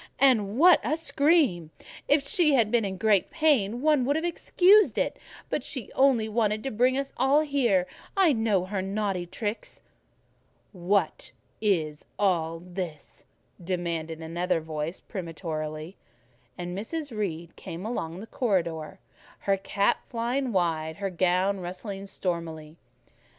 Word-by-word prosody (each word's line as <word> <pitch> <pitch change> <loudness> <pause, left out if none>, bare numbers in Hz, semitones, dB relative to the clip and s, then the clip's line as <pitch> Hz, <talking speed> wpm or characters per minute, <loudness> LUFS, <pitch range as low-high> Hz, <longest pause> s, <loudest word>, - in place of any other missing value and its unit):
"And 230 -6 +3
what 350 +4 +7
a 310 - 0
scream! 285 - +2 0.4
If 285 -1 +3
she 305 -2 +3
had 225 -4 +3
been 240 -2 +3
in 190 -2 -3
great 210 -2 +2
pain 255 -9 +2
one 300 -4 +4
would 285 +3 +1
have 320 +2 -1
excused 375 +4 +4
it, - - 0 0.3
but - - -2
she 250 -7 -5
only 260 -5 +3
wanted 215 -1 0
to 270 - -3
bring 250 +4 +2
us 275 0 -3
all 270 +4 +4
here: 250 -11 +2 0.3
I 365 -6 +5
know 220 -6 +1
her 190 0 -2
naughty 195 -2 -2
tricks." 210 +4 -5 0.9
"What 185 -2 0 0.3
is 160 -8 0
all 165 -4 0
this?" 175 -3 -7 0.4
demanded 165 -3 -3
another 170 +2 -1
voice 155 +2 -5
peremptorily; 160 -2 -5 0.6
and 175 0 -5
Mrs. 275 - -4
Reed 170 -5 -4
came 175 +1 -7
along 175 -7 -4
the - - -7
corridor, 170 - -1 0.4
her 195 - +2
cap 200 +1 +1
flying 245 +3 -1
wide, 160 -4 0
her 195 -1 -3
gown 185 +3 +1
rustling 195 +2 -6
stormily. 165 -5 -4
195 Hz, 135 wpm, -27 LUFS, 175-250 Hz, 0.9 s, what